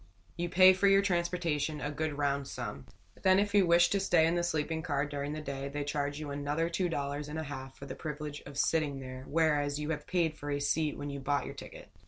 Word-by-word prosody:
You 175 0 -2
pay 185 +2 +8
for 190 +2 +2
your 195 0 +5
transportation, 170 -5 0
a 145 +1 -3
good 150 0 -3
round 140 -1 0
sum. 70 0 -6 0.3
Then 185 0 +5
if 200 0 +1
you 200 -3 +5
wish 170 0 +5
to 200 - +1
stay 175 -4 +4
in 165 - +2
the 175 - +1
sleeping 160 -1 -1
car 145 -4 0
during 145 0 -4
the 155 - -4
day, 140 -1 -4
they 145 +1 -3
charge 145 0 -2
you 150 -2 -5
another 145 +4 -1
two 180 +1 0
dollars 145 -1 -3
and 150 - -5
a 160 - -2
half 135 -2 -7
for 140 - -9
the 135 - -6
privilege 150 -1 -6
of 140 -1 -9
sitting 145 -2 +1
there, 130 0 -8
whereas 150 -2 +1
you 150 +1 -2
have 150 -2 -4
paid 170 -4 +1
for 145 -1 -7
a 145 0 0
seat 150 +1 0
when 145 0 -5
you 140 - -5
bought 140 +1 0
your - - -6
ticket. - - -11
150 Hz, 245 wpm, -31 LUFS, 145-170 Hz, 0.3 s, pay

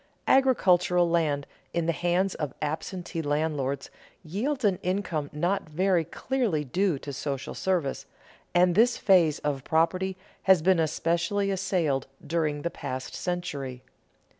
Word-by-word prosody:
Agricultural 180 -10 +4
land 155 -4 +1 0.3
in 170 -1 +1
the 170 - +2
hands 175 +4 +1
of 145 -4 -4
absentee 165 +3 -3
landlords 145 -2 -1 0.3
yields 235 - -2
an 190 -3 +2
income 180 -6 -2
not 175 +3 -1
very 180 +2 +2
clearly 200 - -1
due 175 +4 0
to 140 +1 -7
social 135 0 -4
service, 175 -7 -1 0.5
and 175 0 +5
this 230 +5 +4
phase 175 -6 +4
of 140 -3 -2
property 185 +4 +1 0.2
has 190 -4 +5
been 185 -1 +4
especially 170 +5 0
assailed 180 -8 0 0.2
during 150 -2 -1
the 170 - -1
past 130 -5 -5
century. 140 -8 -4
170 Hz, 130 wpm, -27 LUFS, 150-190 Hz, 0.5 s, and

